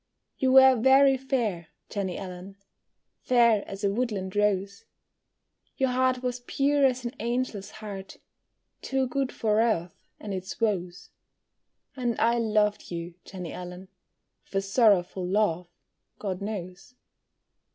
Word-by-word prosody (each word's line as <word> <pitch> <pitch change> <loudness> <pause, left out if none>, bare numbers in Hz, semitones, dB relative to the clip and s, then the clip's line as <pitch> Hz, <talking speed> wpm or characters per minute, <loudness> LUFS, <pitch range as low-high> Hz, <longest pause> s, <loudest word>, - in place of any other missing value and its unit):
You 260 -1 +2
were 265 0 +8
very 265 +3 +5
fair, 235 - -2 0.2
Jenny 195 -4 -3
Allen, 185 0 -8 0.6
Fair 235 -4 +3
as 195 +1 -8
a 200 -1 +2
woodland 205 -5 -2
rose; 200 0 0 0.9
Your 265 -1 +2
heart 255 0 +1
was 250 0 -2
pure 280 +3 +1
as 255 -1 -3
an 240 - -2
angel's 235 -4 -2
heart, 200 -3 -8 0.6
Too 265 -1 0
good 265 +1 -2
for 215 -1 +1
earth 180 -7 0 0.3
and 205 -2 -6
its 190 0 -6
woes, 180 -5 -2 0.8
And 240 -3 -2
I 235 +1 +3
loved 210 -2 +1
you, 170 0 -5
Jenny 180 -4 -7
Allen, 180 +1 -8 0.6
With - - -15
a 195 - +3
sorrowful 195 -3 +3
love, 180 -2 0 0.5
God 190 -2 -4
knows. 195 +1 -6
210 Hz, 130 wpm, -27 LUFS, 190-250 Hz, 0.9 s, were